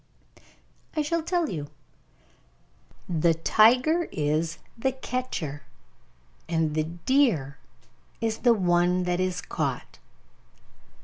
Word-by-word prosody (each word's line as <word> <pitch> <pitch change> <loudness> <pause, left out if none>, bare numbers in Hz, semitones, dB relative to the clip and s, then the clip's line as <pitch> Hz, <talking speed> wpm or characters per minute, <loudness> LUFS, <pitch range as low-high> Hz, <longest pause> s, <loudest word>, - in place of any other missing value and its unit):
I 305 - +1
shall 335 +3 0
tell 345 0 0
you. 150 - -4 1.4
The 165 -1 +2
tiger 250 - +4
is 155 +2 -1 0.2
the 260 +3 -1
catcher, 250 - -4 0.9
and 160 -2 0
the 155 0 0
deer 170 - +1 0.6
is 225 -1 -1
the 240 -2 +4
one 180 -1 +2
that 180 0 -1
is 185 -1 -1
caught. - - -4
180 Hz, 100 wpm, -26 LUFS, 160-255 Hz, 1.4 s, tiger